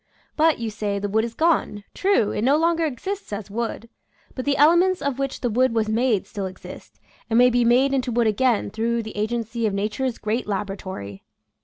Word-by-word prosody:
But, 320 0 +3
you 230 -2 -4
say, 205 -1 -2
the 200 +1 -2
wood 220 +2 +1
is 230 0 -5
gone; 315 -11 +1
true, 385 - +2
it - - -2
no 270 +6 +3
longer 335 0 +2
exists 375 - -5
as 205 -1 -6
wood, 230 +1 -4 0.5
but 255 - -5
the 285 -1 +1
ele 305 +4 +6
ments 370 +1 +2
of 280 -2 -2
which 275 -1 -3
the 245 - 0
wood 250 +1 +2
was 220 -1 +1
made 225 -2 +1
still 200 -3 -5
exist, 185 - -12 0.3
and 225 - +2
may 250 +1 +6
be 245 0 +2
made 255 +4 +3
into 255 -2 0
wood 235 0 +2
again 225 +1 +1
through 230 +1 -1
the 220 - -8
agency 225 +1 -2
of 200 - -2
nature's 220 +5 -2
great 215 +3 -2
laboratory. 190 - -5
235 Hz, 205 wpm, -23 LUFS, 210-265 Hz, 0.5 s, ele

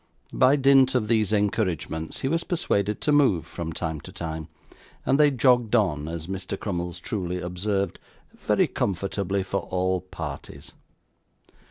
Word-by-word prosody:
By 130 +2 +5
dint 135 -2 +5
of 115 -4 +1
these 110 -2 +2
encouragements, 95 -6 -1
he - - 0
was 165 +4 0
persuaded 105 - 0
to 150 - +1
move 135 - +3
from 85 -1 -5
time 80 -2 -4
to - - -11
time, 80 -2 -5 0.6
and 135 - +3
they 150 -1 +7
jogged 125 -4 +3
on 80 -9 +1
(as 80 -1 -5
Mr. 95 +1 -5
Crummles 90 -4 -3
truly 90 -4 -3
observed) 95 +1 -2 0.4
very - - +2
comfortably 100 +1 -1
for 100 +1 -1
all 95 0 0
parties. 80 -6 -8
100 Hz, 145 wpm, -25 LUFS, 85-120 Hz, 0.6 s, they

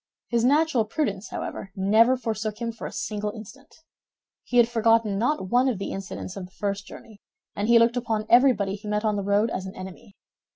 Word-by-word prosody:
His 235 -1 +1
natural 285 -2 +3
prudence, 215 -3 -3
however, 195 - -6
never 220 +6 +4
forsook 220 -3 -3
him 235 -1 -2
for 230 - -7
a - - -8
single 210 -1 -3
instant. 260 +7 -12 0.7
He 245 - -2
had 240 -1 +6
forgotten 225 -3 +2
not 240 -5 0
one 250 +2 +4
of 240 - -2
the 195 - -5
incidents 190 -1 -6
of 195 -2 -6
the 180 - -18
first 200 -1 -3
journey, 215 -3 -13 0.3
and 205 +1 -2
he 235 0 +6
looked 230 +1 +3
upon 225 -3 -1
everybody 235 -6 +4
he 210 +1 -8
met 210 +1 -1
on 215 -1 +1
the 200 - -1
road 205 +3 +1
as 190 0 -4
an 190 - -9
enemy. 190 +2 -10
220 Hz, 205 wpm, -25 LUFS, 200-235 Hz, 0.7 s, had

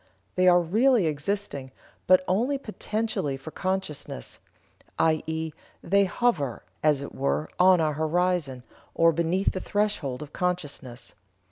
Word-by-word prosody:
They 185 0 +3
are 180 0 +7
really 220 +5 +3
existing, 150 -2 -2 0.4
but 185 0 +6
only 240 +10 +1
potentially 215 - -2
for 135 +4 -9
consciousness, 185 - -4 0.6
i.e., 160 0 0 0.3
they 200 +3 +3
hover, 180 - 0 0.2
as 150 -3 +2
it - - -8
were, 140 +3 -1
on 185 0 +6
our 155 -2 +1
horizon, 160 -4 0 0.3
or 165 0 +5
beneath 170 +4 +1
the 185 - -4
threshold 205 -11 -1
of 150 - -13
consciousness. 145 -9 -4
170 Hz, 125 wpm, -26 LUFS, 150-190 Hz, 0.6 s, are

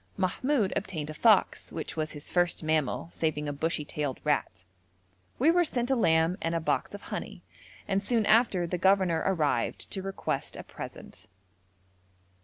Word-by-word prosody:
Mahmoud 205 +4 +1
obtained 160 -6 -3
a - - -7
fox, 215 +5 +3
which 160 - -5
was 155 -1 -3
his 150 0 -7
first 175 -2 +1
mammal, 155 0 0
saving 150 -2 -1
a 145 - -2
bushy 155 +1 -1
tailed 145 -3 -3
rat. 140 -11 -1 0.7
We 300 +6 +5
were 350 +1 +4
sent 250 -5 -1
a - - +4
lamb 165 -5 +3
and 165 0 -1
a - - +1
box 160 - -1
of - - -10
honey, - - -6 0.4
and 195 0 0
soon 225 0 +1
after 215 -5 +4
the 175 +1 -3
governor 190 -4 +3
arrived 150 -10 0
to 195 - -2
request 195 0 -3
a - - -7
present. - - -10
170 Hz, 165 wpm, -29 LUFS, 155-200 Hz, 0.7 s, We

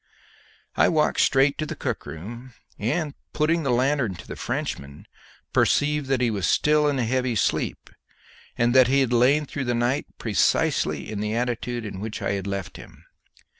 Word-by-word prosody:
I - - +4
walked 155 -2 +1
straight 135 +1 +3
to 155 - -2
the - - -5
cook - - -4
room, 115 - -9 0.2
and, 150 +7 -1 0.2
putting 160 +2 +1
the 140 - -2
lanthorn 125 -4 +1
to - - -12
the - - -6
Frenchman, 70 +1 -5 0.5
perceived 150 -1 +2
that 135 -2 +1
he 120 -2 +2
was 100 -3 -1
still 150 0 +3
in 145 -2 +1
a 125 - +1
heavy 125 0 0
sleep, 100 - -1 0.7
and 120 0 +2
that 130 -2 +6
he 135 +2 +3
had 125 -2 0
lain 135 +6 +4
through 135 -1 -4
the 120 0 0
night 120 +4 0
precisely 75 - +1
in 105 - -4
the 105 +1 -2
attitude 120 -1 -2
in 100 -2 -6
which 110 +2 -5
I 100 - -1
had 100 -1 -3
left 100 -1 -4
him. - - -14
120 Hz, 180 wpm, -24 LUFS, 105-140 Hz, 0.7 s, that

